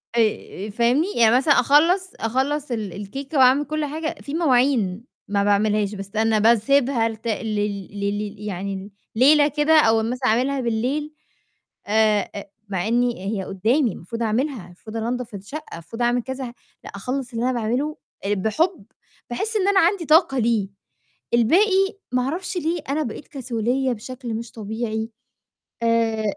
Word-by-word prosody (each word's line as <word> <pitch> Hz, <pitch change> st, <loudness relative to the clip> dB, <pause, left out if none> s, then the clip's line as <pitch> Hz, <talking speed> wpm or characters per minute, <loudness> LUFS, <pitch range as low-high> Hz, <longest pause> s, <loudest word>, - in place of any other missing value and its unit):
آآ 215 Hz, -2 st, -1 dB
فاهمني، 240 Hz, -, +2 dB
يعني 230 Hz, 0 st, +5 dB
مثلًا 285 Hz, +3 st, +4 dB
أخلّص 335 Hz, +9 st, +3 dB
أخلّص 265 Hz, +5 st, -1 dB
ال 215 Hz, -6 st, -3 dB
الكيكة 270 Hz, -, -6 dB
وأعمل 265 Hz, +2 st, +5 dB
كلّ 310 Hz, 0 st, -2 dB
حاجة، 315 Hz, +2 st, -4 dB
في 285 Hz, -, -7 dB
مواعين 250 Hz, -, +2 dB, 0.2 s
ما 200 Hz, 0 st, +1 dB
باعملهاش، 205 Hz, 0 st, +1 dB
بس 195 Hz, +1 st, -9 dB
أنا 220 Hz, 0 st, +2 dB
باسيبها 235 Hz, +2 st, +3 dB
لت 225 Hz, +1 st, -8 dB
لل 210 Hz, -3 st, -2 dB
لل 205 Hz, +1 st, -2 dB
يعني 195 Hz, +1 st, -5 dB, 0.2 s
ليلة 290 Hz, +5 st, +6 dB
كده 300 Hz, +1 st, +4 dB
أو 225 Hz, -5 st, +4 dB
مثلًا 250 Hz, +3 st, -1 dB
أعملها 260 Hz, +4 st, +1 dB
بالليل 255 Hz, +7 st, -1 dB, 0.7 s
آآ 210 Hz, -2 st, +1 dB, 0.2 s
مع 190 Hz, 0 st, -2 dB
إني 240 Hz, +1 st, +2 dB, 0.2 s
هي -, -, -3 dB
قدّامي، 220 Hz, +7 st, +1 dB
المفروض 230 Hz, +7 st, -6 dB
أعملها، 230 Hz, -1 st, -1 dB
المفروض 215 Hz, +5 st, -9 dB
أنضّف 235 Hz, -1 st, -3 dB
الشقة، 210 Hz, -, -8 dB
مفروض 175 Hz, +8 st, -8 dB
أعمل 240 Hz, +1 st, +2 dB
كذا 260 Hz, -1 st, -5 dB, 0.3 s
لأ -, -, -9 dB
أخلّص 250 Hz, +4 st, -4 dB
اللي 230 Hz, -, -2 dB
أنا 255 Hz, -, +1 dB
باعمله 245 Hz, +6 st, -1 dB, 0.3 s
بحُب، 220 Hz, -, 0 dB, 0.4 s
باحس 430 Hz, -, -3 dB
إن 390 Hz, -2 st, +1 dB
أنا 395 Hz, -, +4 dB
عندي 350 Hz, -1 st, +2 dB
طاقة 310 Hz, -3 st, +4 dB
ليه، 220 Hz, -4 st, +1 dB, 0.6 s
الباقي 385 Hz, -, +3 dB, 0.2 s
ما 250 Hz, -, +3 dB
أعرفش 345 Hz, +7 st, -3 dB
ليه 335 Hz, 0 st, -1 dB
أنا 305 Hz, +2 st, 0 dB
بقيت 260 Hz, +2 st, -7 dB
كسولية 255 Hz, -2 st, -1 dB
بشكل 240 Hz, +1 st, -7 dB
مش 230 Hz, +1 st, -6 dB
طبيعي، 220 Hz, 0 st, -4 dB, 0.7 s
آآ 230 Hz, -1 st, +2 dB
235 Hz, 145 wpm, -22 LUFS, 215-280 Hz, 0.7 s, ليلة